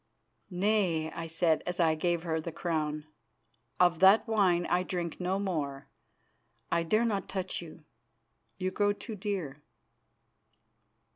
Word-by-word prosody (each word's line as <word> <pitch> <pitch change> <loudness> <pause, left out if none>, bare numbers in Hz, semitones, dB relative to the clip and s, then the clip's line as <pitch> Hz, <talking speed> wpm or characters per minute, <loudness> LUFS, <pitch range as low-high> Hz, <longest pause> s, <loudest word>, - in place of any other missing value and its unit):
"Nay," 180 -4 +1
I 165 0 -5
said, 165 -1 +1
as 180 0 -3
I 165 -2 +4
gave 170 +1 0
her 160 -2 -1
the 170 - -5
crown. 155 -3 -2 0.7
"Of 175 -2 +4
that 195 +6 +6
wine 190 -6 +2
I 180 - +2
drink 175 -2 -4
no 185 +1 0
more. 150 -9 -3 0.8
I 170 - +2
dare 215 +8 +2
not 205 -4 -1
touch 190 -2 -3
you; 160 -2 -11 0.7
you 185 -1 -2
grow 205 +1 +2
too 220 +2 -7
dear." 185 -8 -4
175 Hz, 135 wpm, -30 LUFS, 160-195 Hz, 0.8 s, that